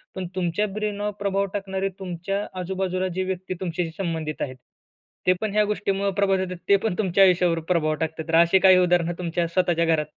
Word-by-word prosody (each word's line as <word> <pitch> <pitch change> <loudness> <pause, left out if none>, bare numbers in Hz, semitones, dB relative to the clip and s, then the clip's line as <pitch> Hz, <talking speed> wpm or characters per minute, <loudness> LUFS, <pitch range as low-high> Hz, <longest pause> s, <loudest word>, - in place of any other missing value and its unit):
पण 185 -2 -4
तुमच्या 180 +3 0
ब्रेनवर 210 -1 -2
प्रभाव 200 0 0
टाकणारे 195 -1 -2
तुमच्या 190 +2 -3
आजूबाजूला 185 0 -2
जे 185 - 0
व्यक्ती 185 0 -4
तुमच्याशी 170 -2 -2
संबंधित 160 -5 -3
आहेत, 130 -2 -3 0.7
ते 185 - +6
पण 215 - -1
ह्या 210 - +4
गोष्टीमुळं 200 -1 -1
प्रभावित 195 -1 +2
होतात, 185 -1 -6
ते 200 - +7
पण 195 -2 -2
तुमच्या 195 -1 +4
आयुष्यावर 180 -2 +3
प्रभाव 155 -3 +2
टाकतात. 160 0 -3
तर 165 - +1
अशी 170 +3 +5
काही 185 -1 +7
उदाहरण 175 -1 +2
तुमच्या 170 -1 -1
स्वतःच्या 170 -1 +1
घरात? 160 -2 +2
185 Hz, 185 wpm, -24 LUFS, 170-195 Hz, 0.7 s, ते